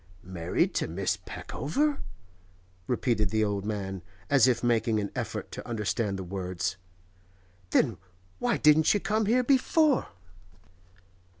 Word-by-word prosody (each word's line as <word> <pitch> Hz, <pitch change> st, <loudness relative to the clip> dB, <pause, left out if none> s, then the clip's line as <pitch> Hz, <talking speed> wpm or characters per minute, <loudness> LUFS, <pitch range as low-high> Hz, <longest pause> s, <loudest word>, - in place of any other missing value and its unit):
'Married 90 Hz, -2 st, -1 dB
to -, -, 0 dB
Miss 90 Hz, +4 st, -1 dB
Peckover?' 280 Hz, -, -1 dB, 0.9 s
repeated 115 Hz, -4 st, +1 dB
the 110 Hz, +1 st, +1 dB
old 100 Hz, -1 st, -2 dB
man, 95 Hz, -3 st, -3 dB, 0.3 s
as 135 Hz, -3 st, +6 dB
if 125 Hz, -1 st, +1 dB
making 115 Hz, -2 st, +2 dB
an 100 Hz, -1 st, -3 dB
effort -, -, -4 dB
to -, -, -8 dB
understand 105 Hz, -2 st, -1 dB
the 95 Hz, -, -5 dB
words. 90 Hz, -1 st, -3 dB, 0.9 s
'Then 110 Hz, 0 st, +2 dB, 0.4 s
why -, -, +1 dB
didn't 155 Hz, +4 st, +5 dB
you -, -, +2 dB
come 215 Hz, +1 st, 0 dB
here 250 Hz, +3 st, +3 dB
before? 280 Hz, +2 st, +3 dB
110 Hz, 125 wpm, -28 LUFS, 95-155 Hz, 0.9 s, as